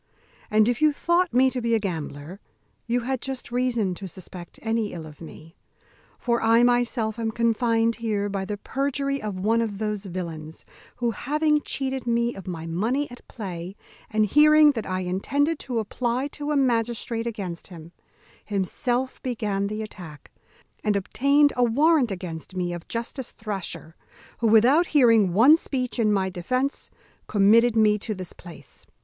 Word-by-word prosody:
And 215 0 +4
if 245 +2 0
you 305 -1 +5
thought 345 +4 +1
me 260 +1 +4
to 255 - -3
be 230 0 +1
a - - +2
gambler 165 -2 -5 0.5
you 245 +1 +1
had 255 +1 -2
just 265 -2 -6
reason 240 -6 0
to 190 +2 -7
suspect 180 -1 -10
any 225 -2 -1
ill 165 -3 -7
of 150 0 -13
me; 165 +1 -12 0.6
for 235 -1 0
I 230 +1 +4
myself 240 -2 +1
am 225 -1 -1
confined 230 0 +1
here 215 -3 -1
by 195 -1 -3
the 210 +1 -4
perjury 275 +3 -2
of 205 -3 -4
one 225 +4 +2
of 215 -3 -3
those 210 -1 -3
villains, 165 -4 -6 0.3
who, 240 -1 0
having 300 +4 +1
cheated 265 -3 -3
me 235 0 +1
of 190 -2 -10
my 165 -3 -5
money 230 - -1
at 245 - -11
play, 185 -4 -7 0.3
and 215 -1 +2
hearing 300 +5 +6
that 225 -6 -5
I 185 0 -2
intended 280 - 0
to 250 -3 -4
apply 240 +4 -1
to 295 +1 -6
a 295 - +2
magistrate 235 -2 0
against 190 -7 -5
him, 170 -3 -11 0.5
himself 240 +6 -2
began 210 -5 -2
the 215 +1 -4
attack, 170 -8 -11 0.5
and 210 -1 +1
obtained 280 +9 +3
a 250 - +2
warrant 280 +3 +3
against 180 -2 -6
me 175 -1 -2
of 175 -1 -8
Justice 235 +2 -4
Thrasher, 195 -6 -5 0.4
who, 230 - +2
without 250 +11 +5
hearing 230 -8 +5
one 260 +9 +8
speech 255 -6 -3
in 215 -2 +3
my 195 -2 +1
defence, 255 +10 -2 0.4
committed 220 +3 +4
me 210 -1 +4
to 215 +1 -4
this 185 -2 -7
place." 170 -2 -11
225 Hz, 165 wpm, -25 LUFS, 195-250 Hz, 0.6 s, one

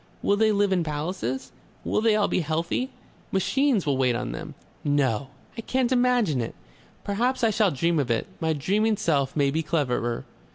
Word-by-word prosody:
Will 200 - +3
they 215 +1 +3
live 205 -1 +2
in 180 -2 +1
palaces? 150 -4 -3 0.3
Will - - 0
they 220 -1 +4
all 210 -1 +2
be - - 0
healthy?... 165 - -1 0.4
Machines 240 - +2
will 140 -3 +1
wait 125 -2 +2
on 120 - -3
them. 160 -2 -7 0.3
No! 140 -4 +1 0.3
I 230 - -5
can't 255 +2 0
imagine 245 - +2
it. 115 - -5 0.5
Perhaps 245 +5 0
I 225 - +4
shall 210 -1 +3
dream 165 +3 +1
of 135 -4 -1
it. 115 -1 +1
My 160 -1 +1
dreaming 205 +9 +1
self 140 -7 0
may 140 -2 +2
be 160 +3 0
cleverer." 130 -7 -1
165 Hz, 180 wpm, -25 LUFS, 140-215 Hz, 0.5 s, they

